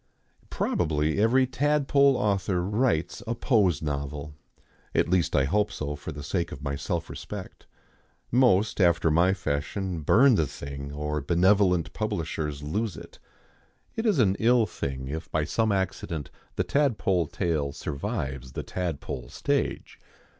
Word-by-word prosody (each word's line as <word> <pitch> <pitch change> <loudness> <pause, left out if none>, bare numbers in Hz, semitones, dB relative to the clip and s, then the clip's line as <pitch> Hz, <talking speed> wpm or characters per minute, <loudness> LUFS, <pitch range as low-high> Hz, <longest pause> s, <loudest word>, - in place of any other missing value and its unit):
Probably 75 0 0
every 130 +4 +4
tadpole 140 +1 +3
author 95 -3 0
writes 105 -2 0
a 115 - -1
pose 100 - +2
novel 75 0 -4 0.6
at - - +3
least 90 -1 +1
I 70 - +4
hope 105 +9 +1
so 75 -1 -4
for 75 +3 -7
the 70 -1 -8
sake 85 +2 -2
of 70 - -8
my 70 -1 -2
self 85 +4 -3
respect. - - -8 0.6
Most, 110 -5 +3
after 85 -2 +4
my 90 +5 +4
fashion, 90 +2 -2
burn 125 - +5
the 80 -8 +2
thing, 70 +1 -7
or 75 +1 -3
benevolent 90 +2 +3
publishers 80 -8 -3
lose 100 +4 -2
it. - - -12 0.8
It 225 +1 -1
is 205 -6 +3
an 100 -6 +3
ill 120 0 +4
thing 65 -8 -5
if 80 +4 -5
by 80 - 0
some 110 +8 +1
accident 90 -6 -2 0.2
the - - +1
tadpole 105 - +1
tale 75 -5 -1
survives 65 -2 -4
the - - -4
tadpole 80 -8 -4
stage. - - -2
85 Hz, 140 wpm, -27 LUFS, 75-105 Hz, 0.8 s, burn